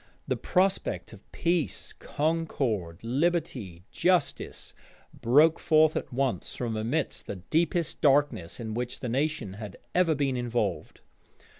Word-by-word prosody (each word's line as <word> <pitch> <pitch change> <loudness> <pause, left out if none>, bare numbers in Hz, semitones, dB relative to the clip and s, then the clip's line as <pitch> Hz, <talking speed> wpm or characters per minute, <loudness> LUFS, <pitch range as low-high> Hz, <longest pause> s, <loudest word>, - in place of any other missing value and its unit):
The - - +1
prospect 190 +1 0
of - - -16
peace, 170 -3 -1
concord, 135 - -2
liberty, 125 - -1
justice, 180 -1 0 0.4
broke 150 +7 +4
forth 155 0 +4
at - - -3
once 130 0 -1
from 115 -3 -3
amidst 115 +9 -2
the - - -4
deepest 165 - 0
darkness 140 - +2
in 110 -2 -4
which 125 +2 -4
the 125 - -3
nation 135 -5 -1
had 105 -3 -7 0.2
ever 175 -3 +3
been 135 -3 0
involved. 120 -6 -2
135 Hz, 125 wpm, -28 LUFS, 115-160 Hz, 0.4 s, broke